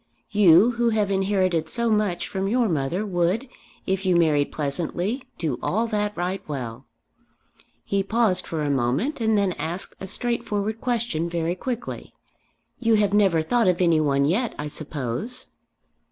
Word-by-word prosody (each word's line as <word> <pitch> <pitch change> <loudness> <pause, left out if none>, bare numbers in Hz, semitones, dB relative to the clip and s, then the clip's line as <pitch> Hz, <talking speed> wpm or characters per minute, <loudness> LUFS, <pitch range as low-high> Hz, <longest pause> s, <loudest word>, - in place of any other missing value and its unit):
You 205 +1 +6
who 235 0 +1
have 210 -3 +1
inherited 190 -4 +1
so 235 -1 0
much 210 -5 0
from 190 0 -2
your 235 +2 +2
mother 165 +4 -1
would, 185 +6 0 0.4
if 190 0 -1
you 185 -2 +2
married 155 -4 +3
pleasantly, 175 - -2
do 155 -7 -2
all 220 +4 0
that 210 -2 -2
right 180 +2 -2
well." 125 -3 -6 1.0
He 200 0 +1
paused 200 -2 +1
for 160 -2 -2
a 145 - 0
moment 140 - 0
and 220 -1 +3
then 200 -2 +2
asked 175 +4 -4
a 190 - -6
straightforward 215 0 -2
question, 230 -10 -1
very 170 0 -1
quickly 240 +5 -5 0.6
"You 230 -2 +3
have 205 -2 +2
never 190 -6 +3
thought 235 +5 +2
of 180 -1 +2
any 170 -3 +4
one 140 -2 +2
yet, 215 - 0
I 150 0 -4
suppose?" 150 - -3
190 Hz, 155 wpm, -24 LUFS, 160-220 Hz, 1.0 s, You